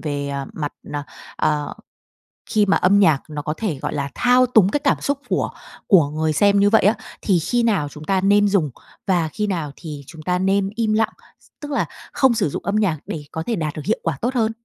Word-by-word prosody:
về, 145 -2 -3
ờ, 140 -1 -4
mặt 145 -2 -4 0.2
n - - -9 0.4
ờ, 150 -1 0 0.8
khi 210 -1 +3
mà 200 - +3
âm 200 +2 +4
nhạc 160 -8 +4
nó 150 -1 -4
có 150 +1 -3
thể, 185 -11 -2
gọi - - -3
là, 140 -1 -2
thao 250 +1 +4
túng 220 -6 +4
cái 290 - 0
cảm - - +1
xúc 285 0 0
của - - 0 0.4
của 170 -8 +5
người 155 +1 -1
xem 200 +6 +4
như 200 +1 +5
vậy 220 - +4
á, 205 +4 +4 0.3
thì 190 -4 +2
khi 240 +9 0
nào 200 -11 +1
chúng 150 +1 -11
ta 190 +4 +1
nên 205 +1 +4
dùng 195 -7 +2 0.4
và 175 -4 +2
khi 210 -1 -1
nào 165 -7 -2
thì 150 -4 -8
chúng 160 - -11
ta 180 +3 0
nên 195 +1 +1
im 225 -2 +1
lặng? 220 0 +1 0.3
S - - -25
tức 295 -1 -6
là 280 - +1 0.3
không 265 -3 +4
sử 195 -8 0
dụng - - -5
âm 200 - 0
nhạc 200 -7 +1
để 155 - -5
có 160 - -4
thể 230 - -1
đạt 155 -3 -2
được 155 - -7
hiệu 220 - 0
quả - - -1
tốt 245 +3 0
hơn? 225 -3 +1
190 Hz, 240 wpm, -21 LUFS, 155-215 Hz, 0.8 s, của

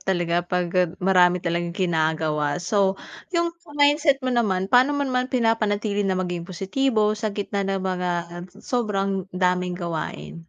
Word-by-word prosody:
talaga 175 -2 0
pag 175 0 -2
gab 180 -2 +1
marami 180 -1 +3
talagang 170 0 -2
ginagawa. 155 -4 0
So, 190 +2 +1 0.4
'yung 340 0 +1
sa 300 -4 -14
mindset 290 0 +4
mo 255 - 0
naman, 205 -6 +1
pan'o 255 +8 +4
mo 285 - 0
naman 255 -1 -1
pinapanatili 215 -4 0
na 190 - +1
maging 175 -2 -3
positibo 215 +4 +1
sa 215 +1 -2
gitna 200 0 -3
ng 195 0 -1
mga, 180 -1 -1 0.2
um, 175 0 -7 0.2
sobrang 195 -5 -1
daming 180 -1 +1
gawain? 170 -1 -6
190 Hz, 155 wpm, -23 LUFS, 175-225 Hz, 0.4 s, mindset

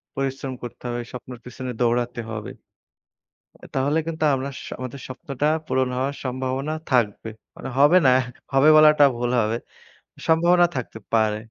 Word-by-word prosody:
পরিশ্রম 135 0 -3
করতে 120 - -9
হবে। 120 0 -3
স্বপ্নের 125 -1 -8
পেছনে 125 0 -6
দৌড়াতে 120 0 0
হবে। 110 -1 -5 1.2
তাহলে 140 +3 +1
কিন্তু 160 -1 -3
আমরা 135 +1 -3
স - - -9 0.2
আমাদের 130 +1 -6
স্বপ্নটা 135 +2 -3 0.2
পূরণ 130 0 +1
হওয়ার 135 +2 -1
সম্ভাবনা 130 +3 -2 0.2
থাকবে। 115 -3 +1 0.3
মানে 135 - -7
হবে 145 +6 +7
না, - - +7 0.4
হবে 135 +3 +6
বলাটা 150 -1 +7
ভুল 120 0 -1
হবে। 110 +2 0 0.7
সম্ভাবনা 175 +2 +5
থাকতে 115 -3 -5
পারে। 110 -2 +2
130 Hz, 140 wpm, -23 LUFS, 120-140 Hz, 1.2 s, হবে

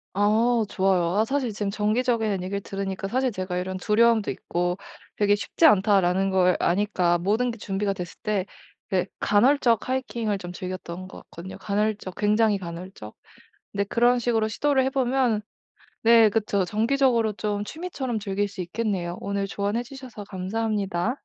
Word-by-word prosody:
아. 215 +4 +3 0.2
좋아요. 190 -2 +2
아 220 - +3
사실 265 -2 -1
지금 205 -1 -3
정기적이란 215 -2 0
얘기를 200 +2 -3
들으니까 195 0 -4
사실 255 0 +1
제가 185 -2 -3
이런 185 +1 -3
두려움도 225 +2 +3
있고 175 +1 -2 0.4
'되게 205 0 +3
쉽지 265 +10 0
않다.'라는 195 - +4
걸 185 -1 +3
아니까 180 -2 +2
모든게 225 +6 0
준비가 200 0 -2
됐을 180 -3 -7
때 205 -3 0 0.5
예 185 0 +1
간헐적 235 +1 +3
하이킹을 235 -5 -1
좀 175 -2 -7
즐겼던 185 0 -6
것 - - -12
같거든요. 175 +3 -10
간헐적 210 -2 -2
굉장히 210 -1 +2
간헐적. 170 - -8 0.6
근데 200 - 0
그런 240 +3 +2
식으로 225 -2 +1
시도를 265 +4 +1
해 265 - 0
보면 255 -4 +1 0.6
네. 230 -1 +7
그쵸. 200 -3 0
정기적으로 230 +1 +2
좀 205 0 -3
취미처럼 270 -5 -4
즐길 200 0 -1
수 200 -1 -8
있겠네요. 180 -2 -2
오늘 200 0 -2
조언해 205 +4 -2
주셔서 250 -5 -10
감사합니다. 205 +2 -2
205 Hz, 355 characters per minute, -25 LUFS, 190-230 Hz, 0.6 s, 네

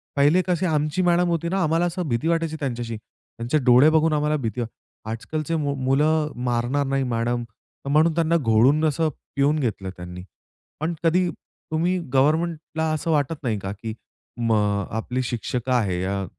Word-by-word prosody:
पहिले 145 +6 +4
कशी 180 0 +1
आमची 155 +1 0
मॅडम 175 0 +3
होती 170 0 -1
ना, 190 +1 0
आम्हाला 165 +2 +2
असं 175 -1 -2
भीती 115 +6 0
वाटायची 165 -1 0
त्यांच्याशी, 120 -5 -3
त्यांचे 120 +5 -5
डोळे 125 +4 +7
बघून 160 0 +3
आम्हाला 150 0 +1
भीती 120 -1 -3 0.5
आजकालचे 155 +8 -3
मु 145 -3 0
मुलं 150 +4 +1
मारणार 125 +4 0
नाही 135 0 0
मॅडम 120 0 -1 0.4
तर - - -3
म्हणून 155 +3 +4
त्यांना 170 0 +2
घोळून 130 +4 +3
असं 155 +1 +1 0.3
पिऊन 145 +2 +2
घेतलं 105 -7 -2
त्यांनी. 90 +1 -8 0.6
पण 160 +3 -1
कधी 175 +2 +3 0.4
तुम्ही 175 +4 +1 0.2
गव्हर्नमेंटला 160 +3 +1
असं 160 +2 -1
वाटत 150 +1 +1
नाही 110 -5 -1
का? 95 0 -5
की 110 +2 -6 0.4
मग, 105 -4 +1
आपली 125 +4 -2
शिक्षक 120 +1 -3
आहे 100 -8 +1
या 95 +1 -2
145 Hz, 160 wpm, -23 LUFS, 120-160 Hz, 0.6 s, डोळे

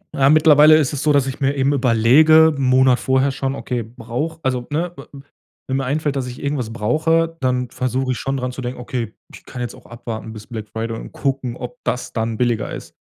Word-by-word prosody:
Ja, 135 0 +4
mittlerweile 155 0 +7
ist 150 -3 0
es 145 - -3
so, 155 - +3
dass 140 -2 +3
ich 135 +2 -6
mir 135 +1 +1
eben 135 +1 +1
überlege, 140 +6 +5
'n 140 - -4
Monat 130 -1 +4
vorher 130 +1 +1
schon: 135 0 -3
„Okay, 125 -3 -3
brauche“ 125 +8 -5
also, 125 -2 -1
ne, 165 +4 -2
we - - -11
w 140 - -11 0.5
wenn 130 - 0
mir 135 - -1
einfällt, 145 +2 -1
dass 130 -2 -2
ich 125 - -8
irgendwas 140 -6 -2
brauche, 160 +9 +1
dann 125 -1 0
versuche 130 +1 -1
ich - - -6
schon 135 0 -2
dran 125 -1 -3
zu 130 - -7
denken: 125 0 -5
„Okay, 120 -3 -4 0.2
ich - - -13
kann 125 - -9
jetzt 120 - -4
auch - - -18
abwarten 115 -1 -7
bis 110 -1 -10
Black 110 -3 -7
Friday 115 0 -4
und - - -9
gucken, 130 -3 -2
ob 125 +5 -7
das 125 - -3
dann 110 -1 -2
billiger 120 -2 0
ist.“ - - -9
130 Hz, 230 wpm, -20 LUFS, 120-145 Hz, 0.5 s, mittlerweile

